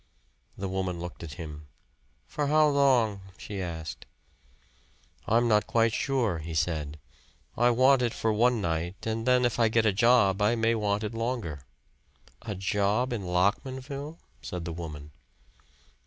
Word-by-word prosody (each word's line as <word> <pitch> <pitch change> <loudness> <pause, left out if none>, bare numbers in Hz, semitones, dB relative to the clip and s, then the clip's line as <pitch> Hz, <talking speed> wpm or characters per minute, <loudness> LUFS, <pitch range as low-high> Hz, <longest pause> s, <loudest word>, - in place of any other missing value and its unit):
The 95 - -3
woman 95 -2 -2
looked 90 0 -7
at 80 -4 -7
him. 75 -2 -8 0.6
"For 145 -1 -2
how 155 +1 +4
long?" 125 -8 +3 0.2
she 100 -2 -6
asked. 80 -3 -6 1.2
"I'm 120 +2 +3
not 105 -2 +3
quite 115 -1 +2
sure," 120 - 0
he 80 +1 -6
said. 75 -2 -1 0.6
"I 120 +1 +4
want 130 +2 +4
it 120 -2 +1
for 110 0 -1
one 120 +2 +3
night, 85 +1 -3
and 115 +1 -2
then 125 -1 +4
if 120 0 -1
I 115 - +5
get 110 0 +2
a 105 - +3
job, 105 -2 +4
I 105 +3 +3
may 115 0 +2
want 105 -1 0
it 105 - -4
longer." 115 - -4 0.7
"A 105 -3 -5
job 105 +5 0
in 105 -5 -4
Lockmanville?" 130 - -1 0.2
said 90 -2 -6
the 85 - -4
woman. 75 -3 -8
105 Hz, 155 wpm, -28 LUFS, 90-120 Hz, 1.2 s, I